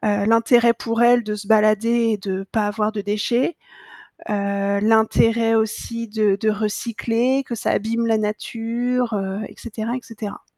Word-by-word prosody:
heu, 205 Hz, -1 st, 0 dB
l'intérêt 235 Hz, +1 st, +4 dB
pour 230 Hz, +1 st, -1 dB
elles 240 Hz, 0 st, +5 dB
de 210 Hz, -1 st, -4 dB
se 205 Hz, -1 st, -8 dB
balader 220 Hz, +2 st, +3 dB
et -, -, 0 dB
de 195 Hz, -1 st, -4 dB
pas 215 Hz, -2 st, 0 dB
avoir 210 Hz, +1 st, -1 dB
de 210 Hz, -, -3 dB
déchets, 225 Hz, -, 0 dB, 0.7 s
heu, 200 Hz, -1 st, -1 dB
l'intérêt 225 Hz, +1 st, +3 dB
aussi 225 Hz, +1 st, -2 dB
de 210 Hz, -2 st, +1 dB
de 220 Hz, -, +2 dB
recycler, 230 Hz, +4 st, -1 dB
que 240 Hz, -, -5 dB
ça 220 Hz, -, -2 dB
abîme 230 Hz, +2 st, 0 dB
la 225 Hz, -1 st, +2 dB
nature, 230 Hz, +3 st, -2 dB
heu, 195 Hz, -1 st, -3 dB
et -, -, -15 dB
cetera, 230 Hz, 0 st, -5 dB
et -, -, -5 dB
cetera. 215 Hz, -3 st, -8 dB
220 Hz, 165 wpm, -21 LUFS, 210-230 Hz, 0.7 s, elles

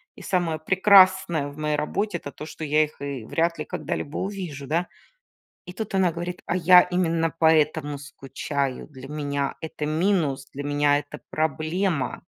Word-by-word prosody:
И -, -, -13 dB
самое 170 Hz, -4 st, -1 dB
прекрасное 190 Hz, -3 st, +5 dB
в 145 Hz, +1 st, -11 dB
моей 150 Hz, 0 st, 0 dB
работе, 195 Hz, +5 st, -1 dB
это 145 Hz, -, -8 dB
то, 150 Hz, -, -9 dB
что 160 Hz, -, -8 dB
я 155 Hz, +1 st, +3 dB
их 150 Hz, -2 st, -8 dB
и 140 Hz, -5 st, -5 dB
вряд 165 Hz, +4 st, 0 dB
ли 155 Hz, -, -3 dB
когда-либо 145 Hz, -, -4 dB
увижу, 180 Hz, -9 st, -5 dB
да. 170 Hz, +3 st, 0 dB, 0.8 s
И 180 Hz, -, -8 dB
тут 215 Hz, 0 st, -6 dB
она 185 Hz, -3 st, +3 dB
говорит: 175 Hz, +2 st, -5 dB
"А 180 Hz, -, 0 dB
я 180 Hz, +1 st, +7 dB
именно 165 Hz, -2 st, 0 dB
поэтому 155 Hz, -2 st, +2 dB
скучаю, 140 Hz, -1 st, -4 dB
для 135 Hz, -2 st, -11 dB
меня 145 Hz, -2 st, -2 dB
это 155 Hz, -1 st, -4 dB
минус! 155 Hz, -5 st, 0 dB
Для 145 Hz, -, -5 dB
меня 145 Hz, 0 st, +2 dB
это 145 Hz, 0 st, -8 dB
проблема!" 155 Hz, 0 st, -1 dB
155 Hz, 165 wpm, -24 LUFS, 145-180 Hz, 0.8 s, я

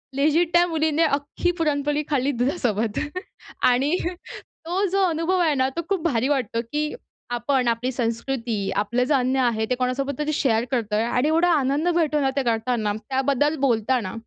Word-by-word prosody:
Lazy 305 Hz, +4 st, +3 dB
त्या 345 Hz, 0 st, +5 dB
मुलीने 320 Hz, -1 st, +1 dB
अख्खी 295 Hz, +3 st, 0 dB
पुरणपोळी 295 Hz, -1 st, 0 dB
खाल्ली 280 Hz, -1 st, +1 dB
दुधासोबत 240 Hz, -, -1 dB, 0.6 s
आणि 270 Hz, +6 st, +3 dB, 0.7 s
तो 360 Hz, +4 st, -1 dB
जो 390 Hz, 0 st, +2 dB
अनुभव 330 Hz, +3 st, 0 dB
आहे 325 Hz, -4 st, +3 dB
ना 260 Hz, 0 st, +1 dB
तो -, -, +1 dB
खूप 390 Hz, -4 st, 0 dB
भारी 255 Hz, -6 st, +1 dB
वाटतो, 250 Hz, -5 st, 0 dB
की 300 Hz, +6 st, -3 dB, 0.4 s
आपण 250 Hz, +1 st, 0 dB
आपली 235 Hz, +2 st, 0 dB
संस्कृती, 230 Hz, -3 st, -2 dB
आपलं 225 Hz, +5 st, +1 dB
जे 265 Hz, -, +1 dB
अन्न 260 Hz, -1 st, +1 dB
आहे 235 Hz, -4 st, +1 dB
ते 250 Hz, -, +1 dB
कोणासोबत 265 Hz, +2 st, -1 dB
तरी 300 Hz, +1 st, -1 dB
शेअर 235 Hz, -5 st, +1 dB
करतोय 220 Hz, -4 st, 0 dB
आणि 250 Hz, +4 st, +1 dB
एवढा 330 Hz, +3 st, +3 dB
आनंद 285 Hz, +2 st, +1 dB
भेटतो 305 Hz, -3 st, +2 dB
ना, 270 Hz, -, +2 dB
ते 275 Hz, -, +1 dB
करताना 225 Hz, -2 st, 0 dB, 0.2 s
त्याबद्दल 275 Hz, +3 st, +1 dB
बोलताना. 235 Hz, -5 st, +1 dB
270 Hz, 165 wpm, -23 LUFS, 240-300 Hz, 0.7 s, त्या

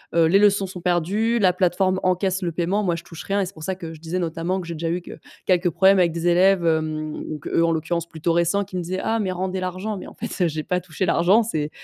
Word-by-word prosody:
heu, 170 Hz, -, +5 dB
les 190 Hz, +5 st, +5 dB
leçons 200 Hz, -1 st, +3 dB
sont 180 Hz, -1 st, -8 dB
perdues. 185 Hz, +7 st, +1 dB
La 190 Hz, -5 st, +4 dB
plateforme 185 Hz, +1 st, +1 dB
encaisse 185 Hz, +1 st, 0 dB
le 175 Hz, -2 st, -2 dB
paiement. 180 Hz, +5 st, 0 dB
Moi, 180 Hz, -4 st, 0 dB
je 170 Hz, -, -7 dB
touche 165 Hz, -1 st, -10 dB
rien 200 Hz, +1 st, 0 dB
et -, -, 0 dB
c'est 180 Hz, -, -7 dB
pour 160 Hz, -, -11 dB
ça 190 Hz, +3 st, -2 dB
que 165 Hz, -3 st, -8 dB
je 160 Hz, -, -12 dB
disais, 165 Hz, +3 st, -3 dB
notamment, 170 Hz, +2 st, -2 dB
que 175 Hz, -, -9 dB
j'ai 170 Hz, -, -4 dB
déjà 165 Hz, +1 st, -4 dB
eu 175 Hz, +2 st, -1 dB
que -, -, -11 dB, 0.3 s
quelques 180 Hz, -1 st, +2 dB
problèmes 190 Hz, +3 st, +4 dB
avec 170 Hz, -2 st, +3 dB
des 170 Hz, +1 st, -2 dB
élèves, 180 Hz, +1 st, +4 dB
hem, 155 Hz, -1 st, 0 dB
ou 155 Hz, -, -5 dB
qu'eux, 165 Hz, +3 st, +1 dB
en 165 Hz, -, +2 dB
l'occurrence, 165 Hz, +1 st, -2 dB
plutôt 165 Hz, 0 st, -2 dB
récents, 170 Hz, +4 st, +2 dB
qui 190 Hz, -1 st, -7 dB
me -, -, -1 dB
disaient: 185 Hz, +2 st, -3 dB
«Ah, 225 Hz, 0 st, 0 dB
mais 190 Hz, -3 st, -1 dB
rendez 185 Hz, +1 st, -3 dB
l'argent», 185 Hz, +3 st, -3 dB
mais -, -, -8 dB
en -, -, -11 dB
fait, 180 Hz, -, -2 dB
j'ai 155 Hz, -1 st, -3 dB
pas 180 Hz, +1 st, 0 dB
touché 180 Hz, +1 st, -3 dB
l'argent. 185 Hz, +6 st, +4 dB
C'est 155 Hz, -9 st, -2 dB
180 Hz, 275 wpm, -23 LUFS, 165-190 Hz, 0.3 s, heu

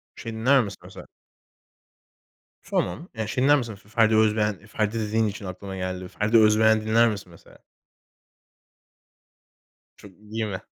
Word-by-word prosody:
Şey 115 Hz, -1 st, -7 dB
dinler 125 Hz, +4 st, +3 dB
misin 100 Hz, -3 st, -8 dB
mesela? -, -, -12 dB, 1.6 s
Tamam. 155 Hz, -, -2 dB
Ya 110 Hz, -2 st, -4 dB
şey 125 Hz, +4 st, -1 dB
dinler 145 Hz, +2 st, +5 dB
misin 115 Hz, -5 st, -4 dB
Fe 100 Hz, +1 st, -21 dB
Ferdi 110 Hz, -1 st, +3 dB
Özbeğen? 105 Hz, -2 st, +1 dB
Ferdi 110 Hz, +1 st, -2 dB
dediğin 110 Hz, +1 st, 0 dB
için 105 Hz, 0 st, -6 dB
aklıma 95 Hz, +1 st, -7 dB
geldi. 90 Hz, 0 st, -4 dB
Ferdi 105 Hz, +5 st, +1 dB
Özbeğen 110 Hz, 0 st, +4 dB
dinler 110 Hz, +2 st, +3 dB
misin 100 Hz, -4 st, -6 dB
mesela? 85 Hz, -, -18 dB, 2.4 s
Çok 100 Hz, -, -14 dB
iyi 110 Hz, +1 st, -4 dB
mi? 95 Hz, -3 st, -6 dB
110 Hz, 140 wpm, -24 LUFS, 100-110 Hz, 2.4 s, dinler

